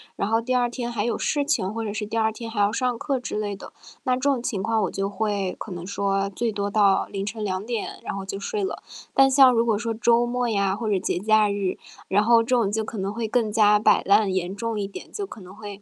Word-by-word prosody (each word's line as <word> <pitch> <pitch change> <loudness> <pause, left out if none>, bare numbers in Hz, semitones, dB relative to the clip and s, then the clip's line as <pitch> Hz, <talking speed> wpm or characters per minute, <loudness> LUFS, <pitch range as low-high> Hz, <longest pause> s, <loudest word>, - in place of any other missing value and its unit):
然 200 - -1
后 225 +1 +2
第 255 +2 -2
2 245 -1 +3
天 240 -1 -4
还 220 -2 -1
有 235 - -1
事 290 -1 0
情 200 -9 0
或 225 0 -3
者 205 - -3
是 215 -1 -3
第 225 +2 -3
2 220 0 +2
天 230 0 -7
还 220 -2 -4
要 200 +1 +3
上 245 0 -1
课 275 -3 -1
之 250 - -5
类 205 -1 -2
的。 - - -11 0.3
那 255 -3 +1
这 255 - -5
种 275 -4 +1
情 225 -6 -2
况 225 -1 +1
我 185 - -1
就 195 0 -2
会 200 -2 -2
可 210 - -7
能 175 0 -6
说 195 0 -1
最 230 +3 -2
多 200 -1 -2
到 200 -2 +3
凌 195 0 -4
晨 215 +1 -5
2 190 0 -2
点， 235 -3 -4
然 - - -4
后 195 -1 -5
就 195 +1 -5
睡 415 - -3
了。 385 - -3 0.3
但 270 0 +6
像 265 -1 +7
如 230 0 +2
果 220 -3 +2
说 230 0 -2
周 235 +1 +3
末 245 0 -1
呀 200 -2 +1
或 220 0 -3
者 200 - +2
节 - - -1
假 215 0 +3
日， 200 -2 -2 0.3
然 205 +2 +3
后 230 0 +5
这 - - -11
种 215 -4 +1
就 220 +1 -1
可 220 - -7
能 195 +2 -2
会 230 -1 -3
更 220 -2 0
加 210 -1 +5
摆 - - +4
烂 200 0 +4
严 185 +1 -2
重 225 0 -3
一 200 - -2
点， 195 - -10
就 405 -2 -4
可 220 - -11
能 185 +2 -12
会 205 -2 -9
215 Hz, 285 characters per minute, -24 LUFS, 200-235 Hz, 0.3 s, 像